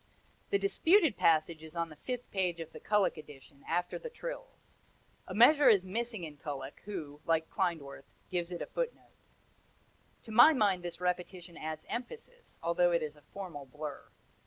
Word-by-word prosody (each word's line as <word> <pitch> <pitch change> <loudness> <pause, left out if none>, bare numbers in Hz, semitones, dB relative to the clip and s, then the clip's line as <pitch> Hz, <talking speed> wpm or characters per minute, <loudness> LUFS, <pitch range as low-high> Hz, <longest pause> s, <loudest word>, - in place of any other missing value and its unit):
The 400 - +3
disputed 370 - +4
passage 160 0 +3
is 160 +1 -11
on 170 -1 -1
the 155 - -11
fifth 245 - -5
page 180 -3 0
of 165 -1 -7
the - - -9
Kullak 210 -2 +2
edition, 140 -2 -13
after 175 +1 -1
the 480 - -6
trills. - - -9 0.5
A 185 - -6
measure 285 +6 +7
is 195 -4 +5
missing 220 0 -3
in 155 -3 -7
Kullak, 145 -1 -6
who, 150 -8 -6
like 160 -1 +1
Klindworth, 160 -8 -2 0.3
gives 175 -1 -1
it - - -3
in - - -6
a - - -5
footnote. - - -4 1.1
To 225 - -10
my 240 +8 +8
mind 200 -8 +2
this 175 -1 -6
repetition 180 -1 -3
adds 155 0 -5
emphasis, 470 - -7
although 175 +1 +3
it 170 -2 +2
is 150 -1 -5
a 150 - -19
formal 145 -3 -8
blur. 150 +2 -7
175 Hz, 175 wpm, -32 LUFS, 155-225 Hz, 1.1 s, my